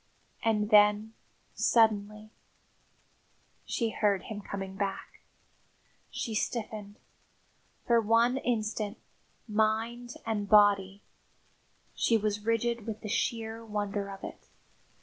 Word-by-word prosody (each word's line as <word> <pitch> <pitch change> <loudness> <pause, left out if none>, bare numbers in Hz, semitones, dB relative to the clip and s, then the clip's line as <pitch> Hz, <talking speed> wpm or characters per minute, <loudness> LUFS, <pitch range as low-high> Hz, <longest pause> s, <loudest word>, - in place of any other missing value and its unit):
And 210 -1 +1
then 210 +1 +5 0.4
suddenly 215 -1 +2 1.3
she 230 -2 -1
heard 205 -4 +1
him 210 -1 -6
coming 195 -1 -6
back! 195 -1 -4 0.9
She 225 - -4
stiffened. 215 -2 -3 0.9
For 235 -1 +4
one 230 +4 +3
instant, 215 -3 -2 0.5
mind 225 +3 0
and 210 -3 -2
body, 200 -2 +4 0.9
she 230 - +2
was 210 -1 -2
rigid 230 0 0
with 220 -1 -5
the 215 - -6
sheer 225 +1 -2
wonder 205 -2 -3
of 195 -1 -9
it. - - -9
215 Hz, 100 wpm, -30 LUFS, 205-225 Hz, 1.3 s, then